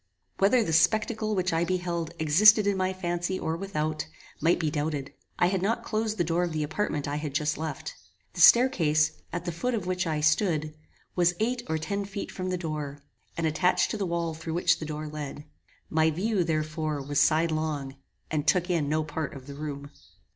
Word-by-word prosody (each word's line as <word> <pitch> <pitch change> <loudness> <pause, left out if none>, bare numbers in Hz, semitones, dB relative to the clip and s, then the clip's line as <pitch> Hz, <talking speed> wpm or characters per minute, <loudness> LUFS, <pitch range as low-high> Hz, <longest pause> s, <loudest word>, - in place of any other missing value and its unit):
Whether 225 +5 +4
the 165 - -2
spectacle 215 +5 +2
which 185 -2 0
I 165 +1 +2
beheld 170 -2 -2
existed 205 +8 +6
in 200 -1 +2
my 185 0 0
fancy 175 0 -2
or 160 -3 -2
without, 155 -4 -3 0.3
might 165 +3 +4
be 155 -3 0
doubted. 145 -2 -3 0.2
I - - +4
had 185 +1 +1
not 230 +4 0
closed 220 -1 -1
the 175 - +2
door 170 +2 0
of 175 -2 -2
the 155 -1 -1
apartment 150 -2 -2
I 145 +1 -2
had 150 -2 -5
just 150 +1 +1
left. 160 - -5 0.4
The - - -3
stair 245 +2 +9
case, 155 - +2 0.2
at 175 0 -4
the 175 - -1
foot 240 +10 -1
of 205 -5 -3
which 185 -1 -1
I 155 -2 0
stood, 155 0 +1 0.4
was 175 -1 +3
eight 240 +3 0
or 160 - +1
ten 200 +6 -3
feet 200 0 -6
from 185 0 -4
the 180 - -1
door, 150 -4 -5 0.3
and 165 - 0
attached 180 +4 +2
to - - -2
the 195 -3 -2
wall 170 -1 -1
through 160 +1 -5
which 175 -1 +3
the 155 - -5
door 155 0 -5
led. 150 -1 -6 0.4
My 160 0 +3
view, 190 +4 0
therefore, 155 -1 -2
was 145 +1 +1
sidelong, 155 -3 +1 0.4
and 155 -1 -1
took 180 +3 +3
in 155 -5 +1
no 155 +1 +1
part 155 -1 -4
of 130 -2 -10
the 140 - -8
room. 140 -1 -6
165 Hz, 205 wpm, -27 LUFS, 155-185 Hz, 0.4 s, stair